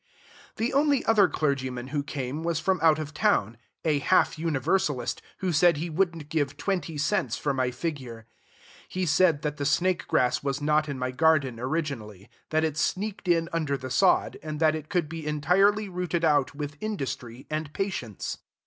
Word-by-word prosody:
The 230 +3 -1
only 280 -1 +3
other 210 -4 +5
clergyman 130 -5 -2
who 145 +1 -1
came 140 0 -4
was 165 -1 -1
from 185 +2 +1
out 160 -2 +5
of 155 -1 -5
town, 115 -7 +1 0.3
a 150 -3 +2
half 185 +6 +3
Universalist, 155 -1 0 0.2
who 185 -2 0
said 170 +1 +5
he 165 +3 -3
wouldn't 165 -3 -1
give 145 -3 -1
twenty 165 -1 -2
cents 155 - 0
for 140 - -1
my 130 -1 0
figure. 125 -4 -5 0.6
He 185 0 -2
said 160 -1 +3
that 150 -1 -2
the 145 - -3
snake 175 +5 +1
grass 125 -1 +2
was 140 -1 -2
not 150 +1 +1
in 140 - -3
my 125 0 -2
garden 140 -4 +2
originally, 125 - -4 0.2
that 155 0 +1
it 155 -2 -1
sneaked 195 +4 -2
in 165 -1 +3
under 155 -4 0
the 130 -1 -7
sod, 185 +8 +3
and 155 -1 -5
that 155 -1 +4
it 155 -1 -6
could 175 -5 0
be 160 -1 -6
entirely 195 +8 +3
rooted 180 -2 -1
out 145 -3 +2
with 150 +1 -5
industry 135 - -4
and 155 -1 -3
patience. 150 - -4
155 Hz, 175 wpm, -27 LUFS, 140-175 Hz, 0.6 s, other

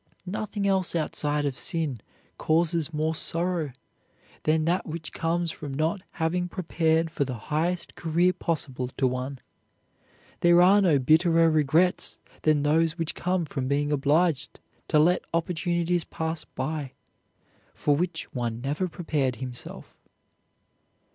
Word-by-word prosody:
Nothing 205 +2 -3
else 190 -3 +2
outside 150 -2 0
of 140 -3 -3
sin 155 - -1 0.4
causes 165 0 +1
more 155 +1 0
sorrow 165 -1 -1 0.7
than 155 0 +2
that 175 +3 0
which 155 -1 -5
comes 170 +1 -1
from 145 -4 -7
not 160 +6 0
having 180 +2 -1
prepared 165 -2 0
for 150 - 0
the 130 -2 -4
highest 165 - -2
career 175 +2 +2
possible 135 -8 -2
to 135 - +2
one. 130 +2 -2 1.0
There 175 0 +5
are 190 +3 +6
no 170 -7 +4
bitterer 165 +4 +4
regrets 155 +4 +2 0.2
than 155 -2 +3
those 160 +2 +2
which 165 -2 -1
come 180 -1 -1
from 135 -3 -3
being 145 +2 0
obliged 150 +2 +1 0.3
to - - +2
let 170 +4 +4
opportunities 170 0 0
pass 160 -1 -4
by 140 0 -4 0.8
for 145 - +2
which 175 +4 -3
one 120 -2 -2
never 145 +8 -1
prepared 155 -7 -1
himself. 125 0 -8
160 Hz, 130 wpm, -26 LUFS, 145-175 Hz, 1.0 s, are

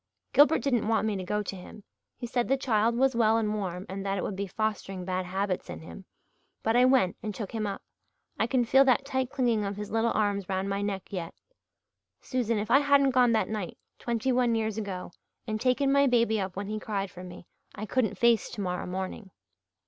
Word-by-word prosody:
Gilbert 295 +3 +5
didn't 245 -7 +1
want 225 -1 +2
me 215 -2 0
to 190 - -4
go 210 +3 -1
to 195 - -5
him 190 +3 -11 0.3
he 245 - -5
said 240 0 -1
the 270 - +2
child 230 -3 +1
was 265 0 +3
well 225 -1 +4
and 215 -2 0
warm 185 -3 -4
and 195 +1 -5
that 195 0 -1
it - - -2
would 200 - -3
be 200 +1 -3
fostering 195 -2 -3
bad 185 0 -2
habits 190 0 -2
in - - -7
him. 185 +4 -11 0.6
But 225 +1 +1
I 250 +1 +6
went 255 -9 +3
and 215 -3 -5
took 210 -5 -5
him 220 -2 -2
up 195 - -5 0.6
I 220 - +2
can 245 0 +1
feel 265 +4 +6
that 265 +1 +3
tight 260 -2 -1
clinging 245 -6 +1
of 200 0 -3
his 210 0 -6
little 225 +1 +2
arms 200 -3 0
round 190 0 -1
my 195 0 -1
neck 200 -1 -4
yet. 170 -3 -5 0.8
Susan, 235 -4 -1
if 210 +1 -3
I 275 - +7
hadn't 280 -1 +4
gone 250 -2 +4
that 220 - +2
night, 210 -5 -4 0.2
twenty 240 +2 -1
one 245 -2 +2
years 220 -2 -1
ago, 195 -5 -5 0.3
and 215 -2 -3
taken 260 +2 +2
my 280 0 +4
baby 230 -4 +2
up 190 -2 -4
when 200 +1 -4
he 215 +2 -4
cried 200 -3 -3
for 180 - -10
me 180 -1 -10 0.3
I 215 - -5
couldn't 215 -3 0
face 235 0 +3
tomorrow 180 -3 -3
morning." 190 +2 -5
215 Hz, 220 wpm, -28 LUFS, 195-245 Hz, 0.8 s, I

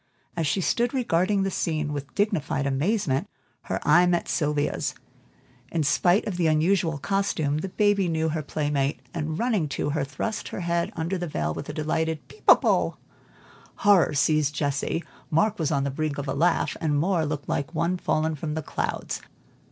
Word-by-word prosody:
As 165 -3 0
she 190 - +1
stood 240 +7 +1
regarding 195 -4 +2
the 195 - -1
scene 155 -4 -1
with 140 -1 -6
dignified 195 -9 0
amazement, 155 +3 0 0.4
her - - -2
eye 175 +4 +6
met 175 -1 +1
Sylvia's. 150 -2 0 0.8
In 165 -2 0
spite 175 +6 +3
of 190 -4 -3
the 170 -2 +2
unusual 165 +1 +2
costume, 155 -2 0
the 190 - -4
baby 205 -1 +2
knew 160 -1 0
her 155 0 -2
playmate, 145 -1 -1
and 155 -1 -3
running 215 -10 0
to 145 - -2
her, 150 -1 0
thrust 215 +10 -4
her - - -5
head 170 0 0
under 170 +3 -2
the 175 - -3
veil 75 - -2
with 140 - -7
a - - -4
delighted 155 +1 -1
"Peep - - -17
a - - +12
bo!" - - +1 0.8
Horror 200 -7 +4
seized 150 0 +2
Jessie, 145 +3 -1 0.3
Mark 205 +6 +2
was 160 -1 0
on 140 -2 +1
the 140 - -1
brink 155 +1 -2
of 140 0 -4
a 135 - -1
laugh, 165 +4 +1
and 150 -3 +1
Moor 170 0 +1
looked 150 -1 -3
like 140 +4 -2
one 170 +3 +1
fallen 160 -2 0
from 150 0 -4
the 160 - -3
clouds. - - -3
160 Hz, 185 wpm, -26 LUFS, 150-180 Hz, 0.8 s, a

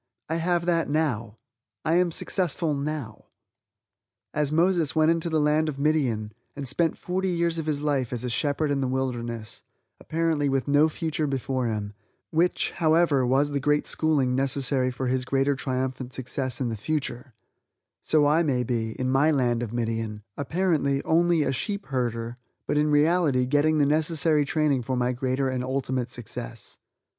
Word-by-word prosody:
I 160 - 0
have 170 +1 0
that 170 -3 +1
now! 125 -8 -1 0.5
I 160 - +2
am 180 -1 +3
successful 170 -2 0
now! 140 -6 -4 1.1
As 150 -1 0
Moses 165 -1 +2
went 155 +1 +4
into 165 0 0
the 160 -1 +1
land 150 +1 +2
of 140 - -5
Midian, 135 -8 0 0.2
and 140 -2 -5
spent 165 +5 0
forty 190 +1 -2
years 170 -1 0
of 160 - -4
his 150 -1 -1
life 140 -5 0
as 125 -1 -3
a 125 - -2
shepherd 145 +3 0
in 140 -1 0
the 130 - 0
wilderness 120 -4 -3 0.4
(apparently 160 -3 0
with 135 0 0
no 145 +2 +4
future 155 -1 -2
before 130 -2 -1
him 105 -2 -3 0.4
which, 170 +2 +1
however, 160 -5 +2
was 140 +3 +2
the 140 - 0
great 150 +2 +1
schooling 145 -5 +1
necessary 135 0 +1
for 130 +1 -4
his 130 0 0
greater 135 +2 +1
triumphant 130 -1 -3
success 130 -1 -4
in 125 -3 -1
the 115 - -3
future) 130 0 -3 0.7
so 155 -2 +3
I 150 +3 +4
may 135 -6 +1
be, 115 -2 -2
in 130 - 0
my 135 +4 +3
land 125 -5 +1
of 115 -3 -4
Midian, 115 -2 -3
apparently, 145 -2 0
only 170 -1 +3
a 135 - 0
sheep 200 +9 -3
herder, 120 -3 -2 0.3
but - - -1
in 150 +1 +2
reality 150 -3 +3
getting 145 +4 +2
the 145 - +4
necessary 155 0 +2
training 145 -3 +1
for 125 +2 -2
my 125 0 +1
greater 130 +2 -1
and 130 -1 -2
ultimate 130 -2 -2
success. 120 -1 -7
140 Hz, 170 wpm, -26 LUFS, 125-155 Hz, 1.1 s, went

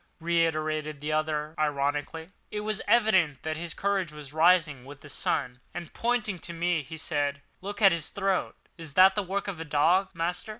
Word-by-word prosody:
reiterated 155 -3 0
the 150 +2 -3
other 155 0 -1
ironically. 145 +2 -1 0.2
It 210 - -4
was 215 0 -2
evident 195 - +3
that 155 0 -2
his 170 +1 -5
courage 195 -5 0
was 150 -2 -9
rising 160 -5 +3
with 140 +2 -12
the 150 - -12
sun; 125 -2 -2 0.2
and, 175 -2 -7
pointing 230 -6 -1
to 170 - -6
me, 170 -1 0
he 155 +3 -9
said, 145 -2 -1 0.2
"Look 205 +3 -5
at 195 - +9
his 165 -2 -1
throat. 195 -1 -1 0.2
Is 160 -4 -8
that 190 +1 +8
the 205 - 0
work 195 +1 -3
of 180 -5 -4
a - - -2
dog, 165 +5 +3
master?" 175 +5 -2
165 Hz, 185 wpm, -28 LUFS, 150-190 Hz, 0.2 s, at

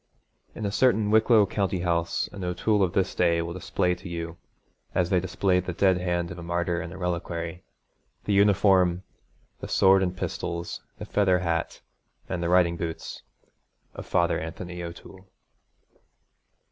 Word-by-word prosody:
In 110 - -4
a 100 - -1
certain 110 -3 +2
Wicklow 110 -1 +5
country 95 -2 -1
house 85 -1 0
an 100 - -7
O'Toole 100 +4 +1
of 95 -2 +1
this 95 -1 +1
day 85 -1 +2
will 85 0 -5
display 90 0 0
to 90 +1 -9
you, 85 0 -5 0.6
as 90 -2 +1
they 90 - +4
display 95 +1 +1
the 90 0 -4
dead 95 +1 +3
hand 85 -1 -1
of 85 - -8
a - - -7
martyr 85 0 -1
in 85 0 -7
a 95 - -9
reliquary, 85 -1 -4 0.6
the 105 - 0
uniform, 95 -3 +4 0.6
the - - -6
sword 95 0 +5
and 90 -1 -1
pistols, 85 -1 -4 0.2
the - - -7
feathered 95 -3 +2
hat 85 -1 -2 0.5
and 90 -2 -3
the 85 - -1
riding 90 -1 +3
boots, 80 -1 -5 0.7
of - - -9
Father - - +1
Anthony 90 +2 -6
O'Toole. 90 +2 -10
90 Hz, 160 wpm, -26 LUFS, 85-95 Hz, 0.7 s, Wicklow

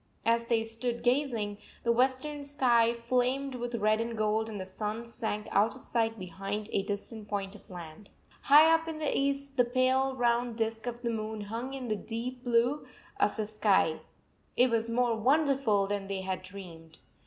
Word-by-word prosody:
As 230 0 +2
they 230 -2 +2
stood 235 +1 -2
gazing, 240 -6 0 0.2
the 235 - +3
western 260 +4 +1
sky 245 -5 +3
flamed 250 +3 0
with 245 -1 -4
red 215 0 +2
and 230 0 -4
gold 215 +1 +1
and 210 -2 -5
the 185 - -4
sun 210 +4 -4
sank 220 -3 -4
out 215 +5 +3
of 260 - -6
sight 225 -1 0
behind 195 +3 -5
a - - +2
distant 205 +2 -5
point 200 -1 -3
of 210 - -16
land. 175 +2 -10 0.3
High 305 +3 +7
up 325 0 +1
in 320 -1 -4
the 305 -2 -1
east 275 0 -1
the 245 - +6
pale 260 +2 +2
round 240 -1 +1
disk 225 +1 -2
of 240 0 -5
the 235 - 0
moon 220 -1 -4
hung 230 +6 -5
in 260 -2 -5
the 215 - 0
deep 240 +4 -5
blue 245 +3 +3 0.4
of 205 - +2
the 215 - -1
101 - - -4
sky. 205 -7 +2 0.6
It 250 0 +5
was 230 0 0
more 240 0 +2
wonderful 265 -4 +2
than 200 0 -3
they 195 -1 -3
had 190 -1 -3
dreamed. 175 -4 -11
230 Hz, 190 wpm, -30 LUFS, 210-255 Hz, 0.6 s, High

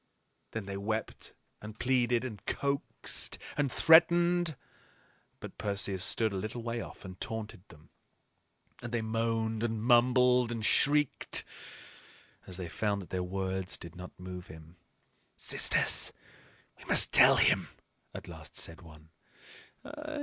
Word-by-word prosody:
Then 110 -3 -4
they 100 0 -5
wept 110 +2 -5 0.3
and 105 +1 -10
pleaded 125 -1 +1
and 110 -5 -8
coaxed 140 0 -2 0.2
and 145 -3 0
threatened. 170 0 +4 0.8
But - - -10
Perseus 100 -2 0
stood 110 -3 +2
a - - -3
little 110 +4 -5
way 115 0 -3
off - - -11
and 95 -1 -10
taunted 110 -6 -6
them; 75 +1 -18 0.9
and 120 -2 -7
they 120 -2 -1
moaned 115 0 -1
and 115 -1 -1
mumbled 125 0 +4
and 115 -2 -3
shrieked, 150 +3 +1 1.0
as 90 - -5
they 90 -2 -5
found 100 +2 -2
that 85 - -16
their 95 - -2
words 95 0 -3
did 85 - -11
not 90 +1 -11
move 90 -1 -8
him. 80 +2 -14 0.6
"Sisters, - - +3 0.7
we - - -15
must - - +5
tell - - +8
him," - - +3 0.4
at - - -9
last - - -10
said 85 +3 -3
one. 80 -2 -16
110 Hz, 135 wpm, -30 LUFS, 95-125 Hz, 1.0 s, tell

